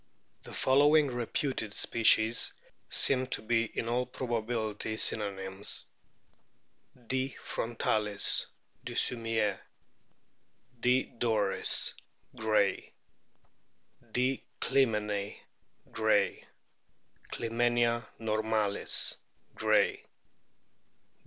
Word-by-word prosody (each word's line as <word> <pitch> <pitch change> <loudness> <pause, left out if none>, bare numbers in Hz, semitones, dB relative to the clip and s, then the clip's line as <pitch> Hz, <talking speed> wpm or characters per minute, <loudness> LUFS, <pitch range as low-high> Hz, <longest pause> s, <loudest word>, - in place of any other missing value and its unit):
The - - -12
following 145 +2 +4
reputed 120 -2 -3
species 115 0 +4 0.4
seem 130 -1 +2
to - - +1
be 115 +1 +1
in 115 - -5
all 125 +2 -1
probability 115 -3 -3
synonyms: 100 -2 0 1.2
D. 130 +2 -2
frontalis, 105 -3 0 0.4
Dussumier; 115 -4 -1 1.2
D. 125 +2 +3
dor 110 -4 -1
is, - - +3 0.4
Gray; 105 -3 0 1.2
D. 125 +2 0 0.2
clymene, 105 -6 0 0.6
Gray; - - +1 0.9
Clymenia 120 0 0
normalis, 110 -2 +1 0.4
Gray. - - +1
115 Hz, 70 wpm, -30 LUFS, 105-125 Hz, 1.2 s, following